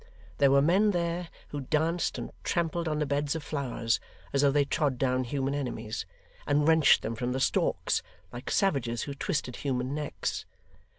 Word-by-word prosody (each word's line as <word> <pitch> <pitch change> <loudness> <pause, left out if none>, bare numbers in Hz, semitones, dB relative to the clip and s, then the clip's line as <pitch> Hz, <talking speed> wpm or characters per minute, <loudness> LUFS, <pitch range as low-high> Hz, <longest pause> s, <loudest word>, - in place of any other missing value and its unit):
There 140 -1 +6
were 140 0 +5
men 190 +7 +4
there, 170 -2 -1 0.2
who 145 - -4
danced 160 +5 0
and - - -5
trampled 170 0 0
on 155 -1 0
the 150 - +1
beds 145 +2 0
of 160 - -4
flowers 125 -6 -1 0.3
as 140 - +3
though 140 - +5
they 145 0 +3
trod 140 -3 0
down 130 0 +1
human 135 +2 -1
enemies, 120 -6 -3 0.4
and 145 +1 +3
wrenched 160 -2 +6
them 110 - -2
from 120 +2 -2
the 130 - -1
stalks, - - +1 0.3
like 120 +1 -6
savages 130 - +1
who 140 - -4
twisted 135 -2 -2
human 130 -1 -1
necks. 150 0 -3
145 Hz, 175 wpm, -29 LUFS, 130-160 Hz, 0.4 s, There